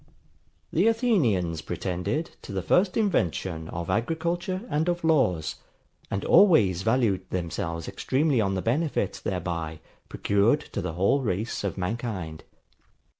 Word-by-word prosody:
The 180 +7 +3
Athenians 125 - +2
pretended 90 - -3
to - - -9
the 95 -2 -2
first 180 - +2
invention 90 - 0
of 85 0 -5
agriculture 170 - -1
and 160 -3 0
of 175 -1 -1
laws: 130 - +2 0.5
and 100 - -2
always 155 - +5
valued 110 -4 +1
themselves 85 -2 -3
extremely 135 -2 +1
on 95 -2 0
the 95 - -2
benefit 135 - 0
thereby 85 -4 -3 0.3
procured 105 +9 +2
to - - -1
the 80 - -3
whole 100 - +2
race 105 -1 -2
of 100 -2 -2
mankind. 95 -5 -4
105 Hz, 125 wpm, -26 LUFS, -, 0.5 s, always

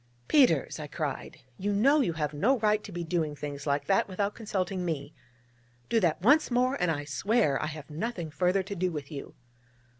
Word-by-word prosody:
'Peters,' 205 - +3
I 150 - -5
cried, 145 -1 -5 0.2
'you 205 +2 -1
know 275 +9 +4
you 175 -10 0
have 150 -2 -2
no 225 - +2
right 215 -1 +2
to - - -9
be 175 0 -4
doing 160 -3 -1
things 145 0 -6
like 140 0 0
that 195 - +2
without 200 +2 -2
consulting 190 -4 -2
me! 155 -5 -3 0.8
Do 230 - +3
that 170 -3 0
once 295 +8 +5
more, 250 +1 +2
and 180 - +2
I 145 -3 -1
swear 170 - +1
I 155 - -1
have 155 -1 -8
nothing 170 -1 -4
further 180 +4 +1
to 200 +2 -6
do 180 0 0
with 150 -2 -6
you!' 140 -2 -8
180 Hz, 200 wpm, -29 LUFS, 150-210 Hz, 0.8 s, once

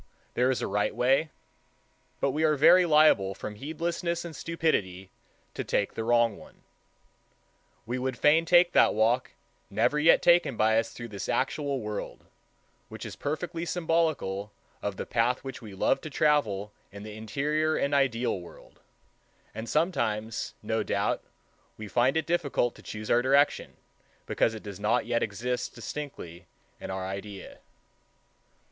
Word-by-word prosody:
There 125 +1 +2
is 130 - 0
a - - -1
right 105 +1 0
way; 135 +5 +2 0.9
but 140 - +1
we 155 +4 -1
are 155 -1 +4
very 175 +5 +6
liable 150 - +4
from 105 - -6
heedlessness 170 - -3
and 165 -2 -7
stupidity 100 - -1 0.4
to - - -4
take 100 - -1
the 115 - -4
wrong 115 -2 +2
one. - - -16 1.2
We 120 +3 -3
would 130 -1 -2
fain 160 +3 +4
take 175 +1 +5
that - - +4
walk, 115 +4 +1 0.4
never 150 - +1
yet 160 +3 +5
taken 170 -8 +4
by 110 +1 +4
us 115 - -3
through 120 -1 -8
this 100 -2 -6
actual 140 0 -1
world, 105 -1 -6 0.6
which - - -8
is - - -7
perfectly 165 +3 -4
symbolical 160 - -1 0.3
of 100 -2 -3
the - - -4
path 120 +2 0
which 135 -1 -7
we 105 -4 -10
love 115 - +1
to 155 - -7
travel 110 -10 +1 0.2
in 100 +1 -10
the 105 0 -8
interior 150 +8 -1
and 140 +1 0
ideal 125 -7 +1
world; 85 - -15 0.7
and 110 +2 -6
sometimes, 115 - -1
no - - 0
doubt, - - -1 0.6
we 110 - -7
find 125 +7 +2
it 160 - 0
difficult 150 -8 0
to - - -16
choose 105 0 -6
our 120 - +5
direction, 140 +3 +2 0.5
because 110 - +1
it 110 - -9
does 100 -2 -8
not 105 +2 +1
yet 120 0 0
exist 120 +6 -3
distinctly 110 - -7 0.3
in - - -7
our 95 0 -3
idea. 100 +1 -7
125 Hz, 155 wpm, -28 LUFS, 105-150 Hz, 1.2 s, very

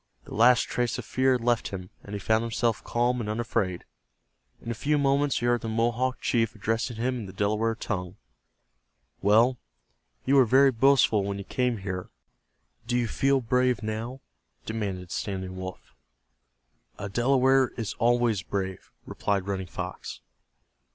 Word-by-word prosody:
The - - -11
last 120 +3 +5
trace 120 -2 -1
of - - -6
fear 130 0 +2
had 125 - 0
left 120 -1 +1
him, 90 -2 -7
and 100 - -9
he - - -3
found 110 +3 +2
himself 115 0 -1
calm 120 +1 0
and 105 - -4
unafraid. 105 -5 -2 0.7
In 115 - -6
a - - -1
few 150 +7 0
moments 140 0 +2
he 120 - -2
heard 120 0 +2
the 115 - -4
Mohawk 120 +3 0
chief 115 -2 +1
addressing 115 +3 -2
him 125 +2 -1
in 110 - -6
the - - -8
Delaware 105 +3 0
tongue. 90 -4 -4 1.1
"Well, 115 +5 +4 0.7
you 140 - +4
were 130 - +7
very 135 +4 +5
boastful 120 -4 +4
when 100 0 -3
you 100 - -5
came 125 +2 -1
here; 95 -2 -5 0.8
do 120 0 +1
you 120 -1 +1
feel 135 +3 +2
brave 125 -1 +1
now?" 115 +5 -4 0.4
demanded 95 -5 -4
Standing 95 -2 -4
Wolf. 95 0 -8 1.0
"A 100 - -5
Delaware 130 +4 +3
is 115 -4 -3
always 120 -3 +2
brave," 95 -1 -4
replied 100 -2 -1
Running 95 -2 -3
Fox. - - -6
115 Hz, 160 wpm, -27 LUFS, 100-125 Hz, 1.1 s, were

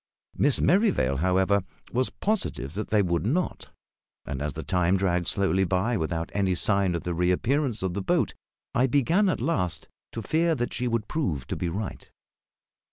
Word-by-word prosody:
Miss 145 -1 +2
Merrivale, 180 - +3
however, 95 +5 +2 0.3
was 125 +1 +1
positive 195 - -2
that 105 +3 -4
they 105 -2 +3
would 85 -2 0
not; 155 - -1 0.6
and 70 -1 -4
as 75 -1 -2
the - - -6
time 90 0 +2
dragged 90 -2 0
slowly 95 -1 +1
by 95 +6 +1
without 80 -2 -2
any 95 -2 +1
sign 100 -1 +2
of 85 - -3
the 90 - -2
reappearance 110 - +1
of 95 -2 -1
the 100 - -2
boat, - - +1 0.4
I 125 +2 +3
began 165 - +3
at - - 0
last 90 - -1 0.3
to 115 - -5
fear 165 +7 +2
that 120 -3 -2
she 125 - -1
would 115 -2 -1
prove 85 - -2
to - - -1
be 90 - -2
right. 100 +4 -5
100 Hz, 175 wpm, -26 LUFS, 90-125 Hz, 0.6 s, Merrivale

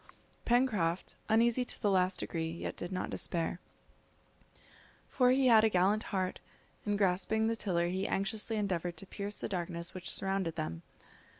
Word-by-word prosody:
Pencroft, 210 -9 +1
uneasy 235 +3 +4
to 245 - -6
the 205 - +2
last 185 0 +2
degree, 160 -1 -2
yet 170 +1 -5
did 175 - -6
not 185 - -3
despair, 170 0 -1 1.5
for 250 -2 +3
he 260 +1 +4
had 225 -3 +7
a 220 - +5
gallant 195 +3 +3
heart, 185 -2 -1 0.5
and 205 0 +1
grasping 200 +3 +1
the 225 +1 +1
tiller 180 -6 0
he 185 +3 -1
anxiously 215 +3 0
endeavoured 180 -5 -1
to 195 - -8
pierce 200 +1 -4
the - - -2
darkness 170 -2 -3
which 185 -1 -5
surrounded 195 -4 -1
them. 80 +1 -4
195 Hz, 160 wpm, -32 LUFS, 175-220 Hz, 1.5 s, had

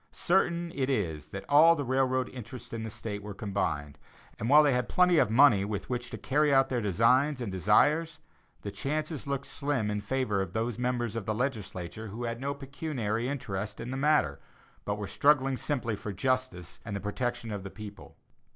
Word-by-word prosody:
Certain 170 -2 +1
it 135 -1 -1
is 80 - -2
that 95 +4 -7
all 160 +4 +7
the 145 - -2
railroad 130 0 +1
interests 125 0 -9
in 115 - -3
the 110 - -4
State 105 -2 -5
were 105 -1 -7
combined; 85 - -3 0.4
and 115 - -2
while 150 +2 +8
they 145 -3 +3
had 125 -1 -1
plenty 180 -2 +4
of - - +3
money 115 -4 +6
with 105 +3 -4
which 125 0 -3
to - - -6
carry 145 +3 +2
out 135 -1 +4
their 125 -2 0
designs 125 - +3
and 120 -5 -4
desires, 150 - +3 0.5
the 100 - -4
chances 150 - -3
looked 140 0 -2
slim 140 -8 -1
in 105 0 -2
favor 115 -5 0
of 90 -2 -4
those 115 +1 -2
members 120 -3 -1
of 115 -4 -4
the 110 - 0
legislature 110 -5 -4
who 110 +4 -6
had 115 +1 -3
no 140 +1 -2
pecuniary 135 -5 -3
interest 105 -7 -4
in 120 +2 -5
the - - -3
matter, 140 - +2 0.5
but 105 - -1
were 105 - -4
struggling 135 0 +3
simply 125 -5 -2
for 105 - -6
justice 100 -5 -2
and 110 -3 -5
the - - -2
protection 115 +3 -3
of 100 -2 -4
the 95 - -7
people. 105 +1 -11
120 Hz, 195 wpm, -29 LUFS, 105-140 Hz, 0.5 s, while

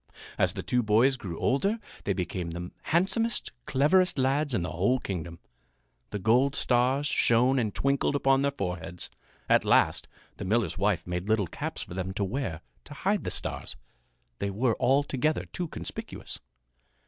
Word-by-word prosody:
As - - +3
the - - -5
two 125 - +1
boys 115 +5 +4
grew 90 -9 -6
older 195 - +1 0.3
they 100 - +1
became 90 -1 -3
the 85 +1 -6
handsomest, 210 +7 +1 0.2
cleverest 175 +7 +3
lads 135 +1 +1
in 90 - 0
the 85 - -3
whole 100 +10 +2
kingdom. 85 -7 -5 0.7
The 105 - -3
gold 125 +7 +3
stars 130 +3 +2
shone 125 -1 +4
and 110 -4 0
twinkled 140 +3 +1
upon 135 -1 +3
their 140 - +2
foreheads. 90 -9 -5 0.4
At - - +4
last - - +3 0.3
the - - -5
miller's 105 +2 +1
wife 100 -3 +1
made 90 +3 -4
little 110 -2 +3
caps - - -5
for - - -10
them 95 +1 -3
to 100 - 0
wear 100 - -3 0.2
to 150 - -10
hide 200 +7 0
the - - -1
stars. - - -2 0.6
They 100 - -1
were 110 +3 +1
altogether 140 +3 +2
too 175 - -2
conspicuous. - - -7
120 Hz, 160 wpm, -28 LUFS, 95-140 Hz, 0.7 s, boys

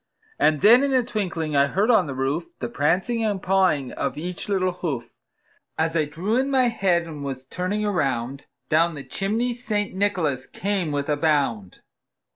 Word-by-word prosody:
And 155 -2 +3
then 230 +6 +7
in 280 -1 +1
a 255 - +3
twinkling 175 -9 -3
I 140 0 +4
heard 200 - +2
on 225 - +4
the 140 - -5
roof, 135 +6 -1
The 120 - -4
prancing 185 - 0
and 205 -3 0
pawing 185 -8 +1
of 140 0 -3
each 175 +5 -5
little 185 -2 +1
hoof. 140 -10 -5 0.6
As 160 +1 0
I 155 -2 +2
drew 175 +10 -2
in 265 +2 +1
my 260 -3 +3
head, 185 -6 +1
and 155 -4 -8
was 135 -1 -5
turning 185 +8 -2
around, 135 - -1 0.2
Down 165 +1 +2
the 140 - -7
chimney 215 - -1
St. 215 -4 -2
Nicholas 180 -10 0
came 195 -5 -2
with 145 -1 -2
a 150 -1 +1
bound. 140 - 0
170 Hz, 180 wpm, -24 LUFS, 145-205 Hz, 0.6 s, then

